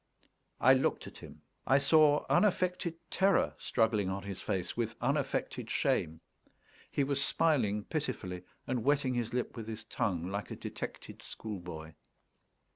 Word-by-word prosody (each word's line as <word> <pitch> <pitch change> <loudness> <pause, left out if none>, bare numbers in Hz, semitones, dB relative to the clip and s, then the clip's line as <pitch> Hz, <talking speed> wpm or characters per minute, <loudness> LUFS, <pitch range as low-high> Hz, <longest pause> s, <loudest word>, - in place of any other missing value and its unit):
I 130 - +7
looked 130 - +1
at - - -10
him. - - -12 0.2
I 135 - +6
saw 150 0 +5
unaffected 180 -4 +2 0.2
terror 195 +1 +3
struggling 110 -4 +1
on 95 0 -3
his 100 -1 -6
face 90 -2 -2
with 115 -2 -2
unaffected 140 +3 -1
shame; 80 +1 0 0.7
he 140 - +1
was 140 0 +1
smiling 115 -13 +2
pitifully 105 - -3 0.2
and 125 -3 -1
wetting 140 -2 +2
his 120 -2 -1
lip 125 0 -2
with 115 -2 -6
his 110 0 -6
tongue, 90 -6 -1
like 100 +1 -3
a - - -5
detected - - -7
schoolboy. 85 -7 -7
120 Hz, 140 wpm, -32 LUFS, 100-145 Hz, 0.7 s, I